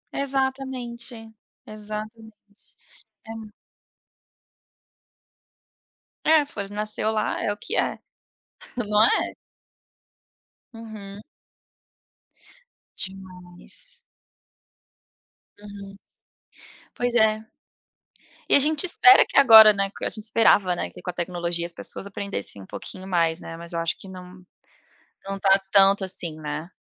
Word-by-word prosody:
Exatamente, 260 -4 -4 0.3
exatamente. 215 0 -10 0.5
É - - -7 2.9
É, 310 -2 +5
foi 200 -8 -7
nasceu 215 +1 -1
lá, 215 - -2
é 205 - 0
o 205 - -5
que 455 - -5
é? - - 0 0.8
Não 210 -2 +2
é? - - +1 1.4
Uhum. 210 -3 -10 1.8
Demais. 190 - -8 1.6
Uhum, 200 -1 -11 1.0
pois 245 0 -1
é. 220 -1 +2 1.0
E - - +4
a - - +9
gente 305 +4 +1
espera 380 +2 +7
que - - -8
agora, 220 -5 +9
né, 195 -1 -1
a - - 0
gente 215 -2 -5
esperava, 205 -5 +3
né, - - -4
que - - -14
com 180 - -4
a - - -8
tecnologia 175 -1 -2
as 175 - -8
pessoas 195 - -6
aprendessem 200 - -5
um - - -13
pouquinho 185 0 -9
mais, 170 -2 0
né, 165 - -9
mas 170 +1 -8
eu 170 - -2
acho 165 0 -2
que 195 - -13
não 185 0 -12 0.8
não 195 0 -4
está 195 0 +4
tanto 195 0 +5
assim, 170 -4 -1
né. 155 +2 -6
205 Hz, 110 wpm, -24 LUFS, 185-225 Hz, 2.9 s, a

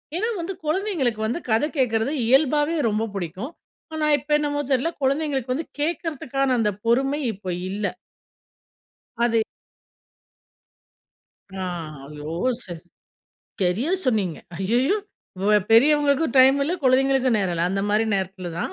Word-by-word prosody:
ஏன்னா 440 +6 0
வந்து, 360 +3 -3
குழந்தைங்களுக்கு 310 - 0
வந்து 240 - -2
கத 220 +4 +3
கேட்கறது 225 0 +1
இயல்பாவே 295 +5 +3
ரொம்ப 215 +2 0
புடிக்கும். 190 - -5 0.4
ஆனா 310 -1 -1
இப்ப 290 +3 -11
என்னமோ 290 -1 -1
தெரில்ல, 270 +5 +1
குழந்தைங்களுக்கு 270 -2 0
வந்து 310 +4 -4
கேட்குறத்துக்கான 290 -4 -1
அந்த 210 -2 +2
பொறுமை 270 +5 +2
இப்ப 185 -2 -5 0.2
இல்ல. 205 +2 -4 1.4
அதே 230 -1 +2 2.1
ஆ. 190 -1 -3 0.5
ஐயோ! 150 +1 -7 0.3
சரி. 175 -3 -8 0.8
சரியா 195 - +1 0.2
சொன்னீங்க. 205 -9 0 0.2
ஐய்யய்யோ! 240 - +1 0.4
வ 200 - +2 0.2
பெரியவங்களுக்கும் 285 +3 +4
டைம் 265 +1 +7
இல்ல, 300 +5 0
குழந்தைங்களுக்கும் 260 -1 +3
நேரம் 190 -4 0
இல்ல. 170 0 0
அந்த 195 - -1
மாரி 215 +2 +2
நேரத்தில 190 -1 -3
தான், 170 - -3
255 Hz, 120 wpm, -23 LUFS, 210-295 Hz, 2.1 s, டைம்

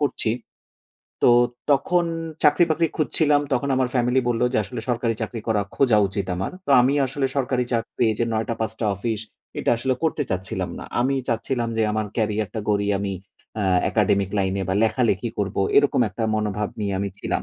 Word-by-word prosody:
করছি, 135 -5 0 0.9
তো - - +7 0.4
তখন 175 +5 +3 0.4
চাকরি-বাকরি 160 +2 +4
খুঁজছিলাম। 150 -1 +2
তখন 130 +2 0
আমার 130 -1 +1
ফ্যামিলি 125 +1 +2
বলল 120 0 0
যে - - +1
আসলে 125 +1 -6
সরকারি 120 -1 0
চাকরি 110 +1 -4
করা 110 -2 +2 0.2
খোঁজা 120 -6 +4
উচিত 100 -1 -3
আমার। 95 +2 -3
তো - - -2
আমি 130 +3 +3
আসলে 135 +1 -1
সরকারি 130 -2 +1
চাকরি 115 0 0
যে 115 - +2
৯ঃ০০-৫ঃ০০ 110 0 -2
অফিস, 110 +2 -3 0.4
এটা - - +1
আসলে 130 +3 0
করতে 160 -2 +1
চাচ্ছিলাম 95 -1 -3
না। - - -7 0.2
আমি 130 +3 +2
চাচ্ছিলাম 120 +1 -1
যে - - +3
আমার 110 -1 -1
কেরিয়ারটা 110 -2 -1
গড়ি 100 -1 +1
আমি 100 -1 -2 0.5
আ - - 0 0.3
একাডেমিক 100 -1 +2
লাইনে 95 0 0
বা 95 - +1
লেখালেখি 115 -1 +1
করবো। 100 -1 -1 0.2
এরকম 145 -2 +4
একটা 105 +3 -4
মনোভাব 105 -1 -1
নিয়ে 100 -2 -1
আমি 100 - -1
ছিলাম। - - -2
115 Hz, 170 wpm, -23 LUFS, 105-130 Hz, 0.9 s, তো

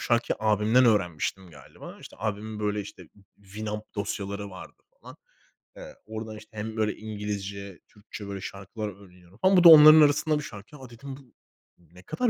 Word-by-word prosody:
şarkıyı 120 0 0
abimden 110 +3 +3
öğrenmiştim 95 -4 0
galiba. 75 -3 -13
İşte, - - -13
abimin 110 0 -4
böyle, 105 0 -1
işte, 100 - -11 0.3
winup 105 +2 -7
dosyaları 100 -1 -5
vardı 95 - -13 0.2
falan. - - -13 0.6
Iıı, - - -11
oradan, 110 0 -7
işte, 110 +1 -16
hem, 110 +1 -6
böyle, 110 -1 0
İngilizce, 100 -3 -6
Türkçe, 105 0 -11
böyle, 100 -1 -6
şarkılar 100 +3 -7
öğreniyorum 90 -2 -17
falan 190 +8 +3
bu 180 - +5
da 170 - +10
onların 155 0 +10
arasında 150 +1 +3
bir - - -6
şarkı. 105 +3 -11
"Ya" 130 -4 -12
dedim, 135 +3 -10
"Bu 130 -4 -20 0.4
ne 90 +1 -20
kadar 245 - -1
105 Hz, 165 wpm, -26 LUFS, 100-120 Hz, 0.6 s, da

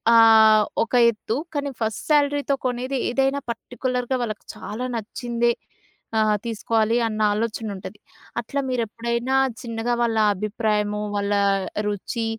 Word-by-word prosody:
ఆహ్, 220 -1 +7 0.2
ఒక 230 - -9 0.2
ఎత్తు 220 0 -4 0.2
కానీ 285 -1 -1
ఫస్ట్ 220 -1 -2
శాలరీతో 285 -1 +3
కొనేది 255 +2 -2
ఏదైనా 270 +3 +1
పర్టిక్యులర్‌గా 250 +2 -2
వాళ్ళకి 215 -2 -5
చాలా 235 +4 -5
నచ్చిందే 235 +2 -1 0.7
ఆహ్, 215 -1 +3
తీసుకోవాలి 225 0 0
అన్న 215 -1 -4
ఆలోచన 225 +1 -2
ఉంటది. 195 +2 -9 0.4
అట్లా 240 +5 -3
మీరు 250 -2 0
ఎప్పుడైనా 235 +4 -2 0.3
చిన్నగా 230 0 -2
వాళ్ళ 230 -1 +1 0.2
అభిప్రాయము 210 0 -1
వాళ్ళ 200 0 0 0.5
రుచి 210 +3 -3
230 Hz, 120 wpm, -23 LUFS, 215-250 Hz, 0.7 s, ఆహ్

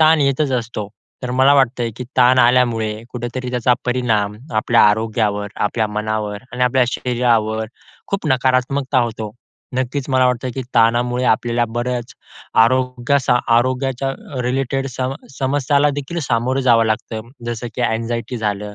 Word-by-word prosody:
ताण 160 0 +5
येतच 140 +1 +1
असतो. 115 -4 -3 0.3
तर 125 - -3
मला 135 +2 +6
वाटतंय, 125 -3 +2
की 125 - -5
ताण 130 0 +5
आल्यामुळे 120 -3 +3 0.2
कुठेतरी 125 +1 -4
त्याचा 125 0 +2
परिणाम 115 -5 0 0.2
आपल्या 110 - +4
आरोग्यावर 105 -1 0 0.2
आपल्या 110 +1 -1
मनावर 105 -1 -2
आणि 125 0 -2
आपल्या 125 0 +3
शरीरावर 115 -3 0 0.4
खूप 195 -4 -2
नकारात्मकता 130 +1 +1
होतो. 110 -2 -4 0.5
नक्कीच 130 +2 -2
मला 130 -1 +4
वाटतं, 125 0 -1
की 130 - -3
ताणामुळे 120 +2 +2
आपल्याला 120 +1 -1
बरच, 120 0 -3 0.5
आरोग्या 125 +2 +1 0.4
आरोग्याच्या 130 +2 0 0.3
रिलेटेड 135 +2 -1
सम 130 +1 -3 0.2
समस्यालादेखील 145 +3 0
सामोरं 125 +3 +1
जावं 115 -1 +5
लागतं. 110 +1 -3 0.2
जसं 120 0 -4
की 125 - -2
एन्झायटी 115 +1 -3
झालं 105 -1 -3
125 Hz, 130 wpm, -19 LUFS, 115-130 Hz, 0.5 s, मला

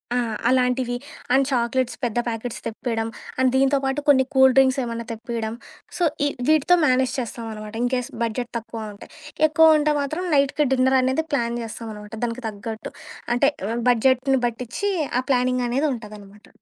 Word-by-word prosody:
ఆ! - - +2 0.3
అలాంటివి. 250 -1 +1 0.4
And 270 +1 +4
chocolates 250 0 0
పెద్ద 240 -2 -1
ప్యాకెట్స్ 230 +1 -4
తెప్పియడం. 225 0 -3 0.3
అండ్ 260 0 +3
దీంతో 270 +1 +3
పాటు 270 +2 0
కొన్ని 265 -2 +6
కూల్‌డ్రింక్స్ 265 0 +5
ఏమన్నా 235 -1 -4
తెప్పియడం. 225 -1 -4 0.4
సో, 355 - 0 0.2
ఈ - - +3 0.2
వీటితో 315 +3 +5
మ్యానేజ్ 255 0 +2
చేస్తాం 235 -1 -5
అనమాట. 215 0 -8
ఇన్‌కేస్ 250 0 -1
బడ్జెట్ 235 +1 -3
తక్కువ 220 -1 -7
ఉంటే. 200 - -13 0.4
ఎక్కువ 315 0 +6
ఉంటే 300 0 +2
మాత్రం 310 +6 -3
నైట్‌కి 280 +2 +2
డిన్నర్ 260 0 +3
అనేది 260 +5 0
ప్లాన్ 235 -3 0
చేస్తాం 225 0 -7
అనమాట 210 0 -11
దానికి 240 +1 -3
తగ్గట్టు. 220 +1 -6 0.4
అంటే, 275 +4 +4 0.4
బడ్జెట్‌ని 260 +2 +3
బట్టించి 240 - -3 0.3
ఆ - - +1
ప్లానింగ్ 250 -1 +2
అనేది 275 +6 +1
ఉంటాదనమాట. 210 -3 -11
250 Hz, 150 wpm, -23 LUFS, 230-265 Hz, 0.4 s, కొన్ని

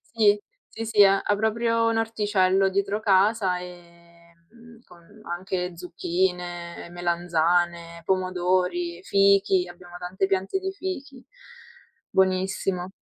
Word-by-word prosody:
Sì. 220 -10 +2 0.3
Sì, 225 0 -6
sì. 215 -2 +6
Ha 195 0 +4
ha 205 - +1
proprio 230 +2 +1
un 225 0 +1
orticello 200 -4 +2
dietro 200 +2 -1
casa, 195 -2 +2
ehm, 170 -1 -14 0.2
mhmm, 235 0 -17
con 170 -2 -19
anche 180 0 -4
zucchine, 175 0 -3
melanzane, 170 0 0
pomodori, 180 -1 0
fichi. 195 -2 +3
Abbiamo 175 0 -12
tante 185 +2 -2
piante 195 - -1
di 385 0 -4
fichi, 295 -9 -6 0.9
buonissimo. 190 -1 0
185 Hz, 110 wpm, -25 LUFS, 175-210 Hz, 0.9 s, sì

